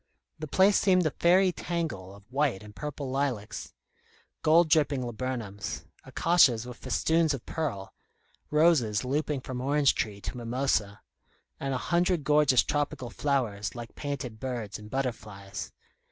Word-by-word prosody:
The 155 - -5
place 190 +6 +4
seemed 185 -3 +3
a 155 - +2
fairy 185 +4 +4
tangle 155 - -4
of 100 - -16
white 135 -7 0
and 105 0 -13
purple 145 -2 -5
lilacs, 130 -6 -2 0.7
gold 165 +2 +5
dripping 145 -4 +2
laburnums, 115 -4 -4 0.2
acacias 135 -10 +3
with 125 -1 -8
festoons 160 +5 +1
of 125 - -10
pearl, 125 -12 -4 0.6
roses 150 -8 +3
looping 145 +1 -1
from 125 -1 -5
orange 140 +1 +3
tree 105 -2 -3
to - - -5
mimosa, 120 -4 -1 0.6
and 135 -1 -2
a 125 - -5
hundred 175 -2 +2
gorgeous 145 -4 +4
tropical 145 -4 -2
flowers 120 -9 -1
like 120 -1 -8
painted 135 -6 -5
birds 120 -5 -4
and 105 0 -11
butterflies. 105 -7 -4
135 Hz, 140 wpm, -28 LUFS, 115-150 Hz, 0.7 s, gold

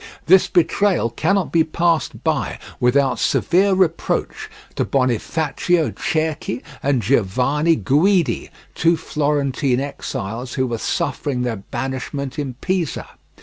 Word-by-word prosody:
This 185 +2 +6
betrayal 180 - +2
cannot 195 - 0
be 165 -1 +4
passed 165 0 0
by - - -1 0.2
without 135 +2 +2
severe 190 +4 +2
reproach 185 -3 -1 0.2
to - - 0
Bonifacio 145 +6 0
Cerchi 155 -8 -2 0.2
and 135 -4 +1
Giovanni 135 - +2
Guidi, 150 - +2 0.2
two 165 0 +2
Florentine 145 -4 0
exiles 125 -3 -5
who 130 - +1
were 120 -3 -3
suffering 130 0 -2
their 120 -3 -2
banishment 130 +6 -5
in 135 -4 -4
Pisa. 185 -5 -2
145 Hz, 110 wpm, -20 LUFS, 125-165 Hz, 0.2 s, This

